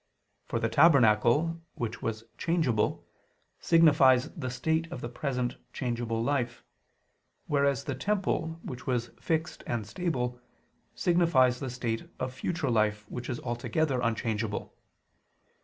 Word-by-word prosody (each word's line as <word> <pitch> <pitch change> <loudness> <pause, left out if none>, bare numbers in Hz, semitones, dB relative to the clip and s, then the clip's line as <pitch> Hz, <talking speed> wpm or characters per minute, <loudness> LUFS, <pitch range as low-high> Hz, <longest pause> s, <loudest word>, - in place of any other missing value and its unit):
For - - -1
the - - +1
tabernacle, 140 +2 +4
which 120 -2 -4
was 110 0 -3
changeable, 155 -11 0 0.5
signifies 145 -6 +5
the 140 -8 -4
state 160 +6 -1
of 130 - -5
the 120 - -4
present 125 -1 -2 0.2
changeable 120 -2 -2
life: 125 -3 -1 0.8
whereas 140 -3 +1
the 140 - -3
temple, 165 0 -1
which 125 -1 -7
was 120 -2 -1
fixed 160 0 -2
and 115 -3 -2
stable, 125 - -2 0.5
signifies 155 -8 +3
the 135 - -4
state 120 -2 -3
of 130 0 -3
future 160 0 -2
life 105 -2 +1
which 125 0 -5
is 120 - -2
altogether 125 +3 -1
unchangeable. 110 -2 -2
125 Hz, 125 wpm, -29 LUFS, 120-160 Hz, 0.8 s, signifies